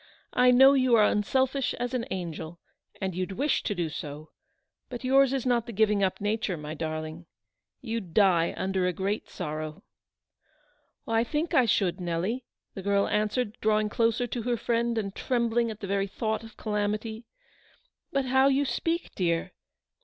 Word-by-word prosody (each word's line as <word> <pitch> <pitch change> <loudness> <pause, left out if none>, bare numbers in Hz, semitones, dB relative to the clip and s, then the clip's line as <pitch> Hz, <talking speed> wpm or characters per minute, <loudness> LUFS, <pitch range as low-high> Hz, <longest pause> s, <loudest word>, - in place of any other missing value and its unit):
I 250 0 +5
know 265 +2 +8
you 255 -3 +4
are 215 - +6
unselfish 260 +6 +1
as 245 +1 -3
an 250 -1 -2
angel, 170 -3 -5 0.4
and 190 -1 -2
you'd 185 +2 -3
wish 280 +9 +1
to 205 - -2
do 175 -2 -1
so; 155 0 -7 0.6
but 245 0 -7
yours 270 +1 +4
is 270 -2 -1
not 240 -2 +1
the - - -5
giving 210 -1 +2
up 190 - 0
nature, 205 -3 -1
my 150 0 -6
darling. 155 +1 -5 0.5
You'd 225 -6 -4
die 180 -4 +3
under 190 -1 0
a 180 - 0
great 195 +4 -2
sorrow." 155 0 -5 0.6
" 305 -1 -38 0.5
I 225 0 +2
think 300 +7 -2
I 255 - +5
should, 185 -5 +1
Nelly," 180 +9 -2 0.3
the 195 - -6
girl 200 +1 +2
answered, 215 +2 -1
drawing 215 0 +2
closer 230 +2 +1
to 240 0 -4
her 240 +1 0
friend, 235 +1 0
and 200 -3 -2
trembling 235 -1 0
at 215 -1 -8
the 200 - -4
very 195 0 0
thought 220 +2 -2
of 225 -1 -13
calamity; 215 +2 -2 0.4
" - - -36
but 275 -1 0
how 265 +1 +4
you 275 +1 +3
speak, 330 +7 -2
dear. 170 -1 0
215 Hz, 175 wpm, -28 LUFS, 185-245 Hz, 0.6 s, know